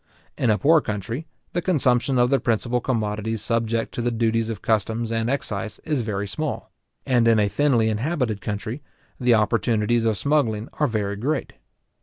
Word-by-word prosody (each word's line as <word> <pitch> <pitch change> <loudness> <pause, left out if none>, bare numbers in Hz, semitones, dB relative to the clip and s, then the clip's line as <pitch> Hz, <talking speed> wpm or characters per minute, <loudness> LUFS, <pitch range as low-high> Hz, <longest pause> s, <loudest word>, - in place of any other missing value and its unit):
In 125 - 0
a 105 - +4
poor 155 +5 +5
country, 115 - -4 0.3
the 175 - 0
consumption 135 -7 +2
of 125 +1 +3
the 135 - +4
principal 120 +1 0
commodities 110 -2 -2
subject 115 -1 -1
to - - -3
the 120 - +1
duties 115 -1 0
of 110 -4 -5
customs 110 +1 0
and 115 0 0
excise, 110 -6 -3
is 150 -5 0
very 105 -2 -3
small; 155 +8 -4 0.3
and 120 -3 +3
in 115 -1 +5
a 105 -1 +3
thinly 120 -1 +2
inhabited 115 - -1
country, 110 +7 -4 0.4
the 125 -2 +4
opportunities 115 +1 +1
of 110 -2 +1
smuggling 120 -5 0
are 150 - +1
very 105 -4 -2
great. 140 +7 -2
115 Hz, 170 wpm, -23 LUFS, 110-130 Hz, 0.4 s, poor